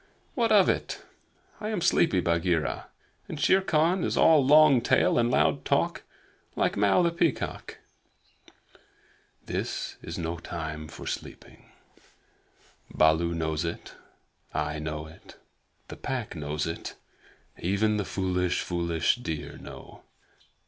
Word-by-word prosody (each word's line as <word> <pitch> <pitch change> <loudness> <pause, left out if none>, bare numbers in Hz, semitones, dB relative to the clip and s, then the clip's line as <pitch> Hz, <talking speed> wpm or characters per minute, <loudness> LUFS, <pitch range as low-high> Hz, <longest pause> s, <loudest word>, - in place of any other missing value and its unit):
"What 230 -3 +1
of 200 -3 +6
it? - - -2 0.6
I 210 - -4
am 215 -4 -1
sleepy, 130 - +3
Bagheera, 85 -1 0 0.4
and 155 - -6
Shere 190 +5 +4
Khan 175 +1 +2
is - - -1
all 155 -3 +6
long 145 -2 +6
tail 120 - +3
and 120 0 +2
loud - - +2
talk - - 0 0.5
like - - +1
Mao, 100 - +3
the 170 - +2
Peacock." 170 -4 -2 0.8
"But - - -38 0.8
this - - -4
is - - -6
no 85 0 -3
time 80 -2 -6
for 75 -2 -10
sleeping. - - -8 1.2
Baloo 80 +2 +3
knows 80 -1 -1
it; 85 - -5 0.6
I 75 +1 -1
know 75 0 -4
it; 80 +1 -15 0.5
the - - -9
Pack 120 -7 -4
know 75 -1 -4
it; 75 - -1
and 80 0 -5 0.7
even 105 +4 +1
the 105 - 0
foolish, 90 -2 -1
foolish 85 +1 0
deer 80 -11 -6
know. - - -11
90 Hz, 130 wpm, -27 LUFS, -, 1.2 s, of